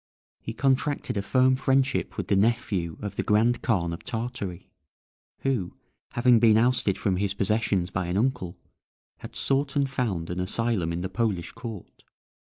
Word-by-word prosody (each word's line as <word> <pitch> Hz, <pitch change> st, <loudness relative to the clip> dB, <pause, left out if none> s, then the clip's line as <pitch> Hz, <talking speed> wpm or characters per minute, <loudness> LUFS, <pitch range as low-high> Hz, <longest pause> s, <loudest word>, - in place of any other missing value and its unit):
He 115 Hz, -, -6 dB
contracted 135 Hz, +1 st, 0 dB
a 100 Hz, -, 0 dB
firm 130 Hz, +5 st, +3 dB
friendship 135 Hz, 0 st, +1 dB
with -, -, -3 dB
the -, -, +2 dB
nephew 100 Hz, -6 st, 0 dB
of 100 Hz, -1 st, -5 dB
the -, -, +2 dB
Grand 115 Hz, +3 st, +2 dB
Khan 85 Hz, -7 st, 0 dB
of 85 Hz, -, -8 dB
Tartary, 110 Hz, -7 st, -5 dB, 0.7 s
who, 125 Hz, -10 st, -1 dB, 0.4 s
having 120 Hz, -1 st, +5 dB
been 110 Hz, -2 st, +5 dB
ousted 120 Hz, -4 st, +2 dB
from 95 Hz, -3 st, 0 dB
his 100 Hz, 0 st, -1 dB
possessions 100 Hz, -3 st, +1 dB
by 90 Hz, -2 st, -2 dB
an 90 Hz, +2 st, -1 dB
uncle, 115 Hz, -6 st, -1 dB, 0.6 s
had -, -, -10 dB
sought 140 Hz, +1 st, 0 dB
and 140 Hz, -1 st, +2 dB
found 105 Hz, -11 st, -2 dB
an 90 Hz, -, -3 dB
asylum 95 Hz, -2 st, 0 dB
in 85 Hz, +1 st, -3 dB
the 95 Hz, -, -2 dB
Polish 95 Hz, -4 st, -1 dB
court. 115 Hz, -5 st, -9 dB
110 Hz, 160 wpm, -26 LUFS, 95-125 Hz, 0.7 s, having